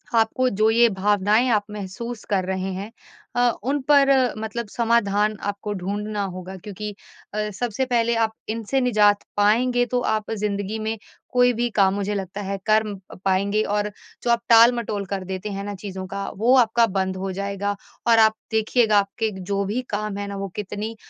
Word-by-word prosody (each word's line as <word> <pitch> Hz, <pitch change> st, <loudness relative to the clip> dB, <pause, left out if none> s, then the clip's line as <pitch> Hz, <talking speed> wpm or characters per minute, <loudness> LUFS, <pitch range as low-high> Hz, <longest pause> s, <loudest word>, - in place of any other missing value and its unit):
आपको 230 Hz, +3 st, +2 dB
जो 215 Hz, +1 st, +2 dB
ये 235 Hz, +1 st, +5 dB
भावनाएँ 205 Hz, +3 st, +2 dB
आप 210 Hz, -3 st, +2 dB
महसूस 210 Hz, +3 st, -6 dB
कर 190 Hz, -3 st, +1 dB
रहे 190 Hz, 0 st, -2 dB
हैं, 200 Hz, +4 st, -6 dB, 0.4 s
अ, 245 Hz, 0 st, +4 dB
उन 280 Hz, +4 st, 0 dB
पर 280 Hz, -1 st, +6 dB, 0.3 s
मतलब 220 Hz, +1 st, -4 dB
समाधान 215 Hz, -2 st, +1 dB
आपको 205 Hz, +1 st, -3 dB
ढूँढना 205 Hz, +2 st, -3 dB
होगा 185 Hz, +1 st, -7 dB
क्योंकि 205 Hz, +2 st, -7 dB, 0.4 s
अ, 210 Hz, 0 st, -1 dB
सबसे 240 Hz, +5 st, -2 dB
पहले 235 Hz, -2 st, +1 dB
आप 225 Hz, -1 st, +1 dB, 0.2 s
इनसे 230 Hz, +4 st, -1 dB
निजात 210 Hz, -4 st, +3 dB
पाएँगे 245 Hz, +4 st, +3 dB
तो 245 Hz, -, +3 dB
आप 215 Hz, -2 st, -1 dB
ज़िंदगी 205 Hz, 0 st, -2 dB
में 220 Hz, +1 st, -2 dB, 0.4 s
कोई 245 Hz, 0 st, +4 dB
भी 240 Hz, +1 st, 0 dB
काम 195 Hz, -2 st, +4 dB
मुझे 200 Hz, +1 st, -2 dB
लगता 195 Hz, +1 st, -4 dB
है 200 Hz, 0 st, -3 dB
कर 215 Hz, 0 st, +4 dB
म 200 Hz, -2 st, -6 dB, 0.3 s
पाएँगे 200 Hz, +3 st, +2 dB
और 210 Hz, 0 st, 0 dB, 0.3 s
जो 240 Hz, -, -1 dB
आप 235 Hz, -, +2 dB
टाल-मटोल 230 Hz, -3 st, +5 dB
कर 190 Hz, 0 st, -4 dB
देते 190 Hz, +2 st, -4 dB
हैं 195 Hz, 0 st, -4 dB
ना 205 Hz, 0 st, -4 dB
चीज़ों 190 Hz, -1 st, -6 dB
का 195 Hz, +1 st, -4 dB
वो 240 Hz, +5 st, +4 dB
आपका 235 Hz, -1 st, +4 dB
बंद 190 Hz, -1 st, -1 dB
हो 190 Hz, 0 st, -3 dB
जाएगा 200 Hz, +1 st, -2 dB, 0.3 s
और 230 Hz, -1 st, +6 dB
आप 220 Hz, 0 st, +5 dB, 0.2 s
देखिएगा 220 Hz, 0 st, +3 dB
आपके 215 Hz, +3 st, -1 dB
जो 200 Hz, +2 st, -1 dB
भी 220 Hz, +6 st, -1 dB
काम 210 Hz, -1 st, -3 dB
हैं 205 Hz, -, -4 dB
ना, 200 Hz, -, -5 dB
वो 195 Hz, -, -3 dB
कितनी 210 Hz, +2 st, -4 dB
210 Hz, 180 wpm, -23 LUFS, 200-230 Hz, 0.4 s, पर